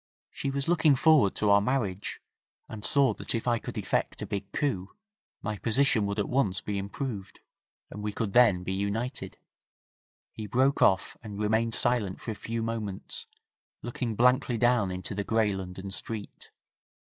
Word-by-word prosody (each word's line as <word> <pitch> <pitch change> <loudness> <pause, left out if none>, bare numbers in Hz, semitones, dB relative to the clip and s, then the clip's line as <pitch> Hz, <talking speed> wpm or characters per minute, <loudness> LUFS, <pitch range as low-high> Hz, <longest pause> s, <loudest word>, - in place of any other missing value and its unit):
She 140 - -3
was 135 0 -3
looking 160 -4 +4
forward 140 - +4
to 105 -1 +2
our 100 0 +6
marriage, 105 -5 -2 0.5
and 105 -2 -8
saw 140 -2 +4
that - - -3
if 115 - -3
I 120 -1 +2
could - - -7
effect - - -1
a - - -3
big 100 -1 -5
coup 100 -11 -2 0.5
my 105 -2 -3
position 115 -3 +3
would 100 +1 -3
at 105 - 0
once 105 -9 +1
be 100 +2 -3
improved, 100 0 -5 0.5
and 105 - -7
we 105 0 -2
could 100 -1 -3
then 105 -8 +5
be 95 - -3
united.' 100 +6 -3 0.9
He 110 -1 -7
broke 130 +6 +2
off, 95 0 +3
and 105 -4 -8
remained 110 +2 +1
silent 120 -6 +2
for 115 - -5
a - - -2
few 115 +2 -4
moments, 110 -4 -4 0.6
looking 120 -1 -3
blankly 125 +1 +3
down 120 -4 +3
into 90 +2 -4
the 100 +1 -2
grey 110 -1 +1
London 95 0 -6
street. 105 +1 -6
110 Hz, 170 wpm, -28 LUFS, 100-125 Hz, 0.9 s, our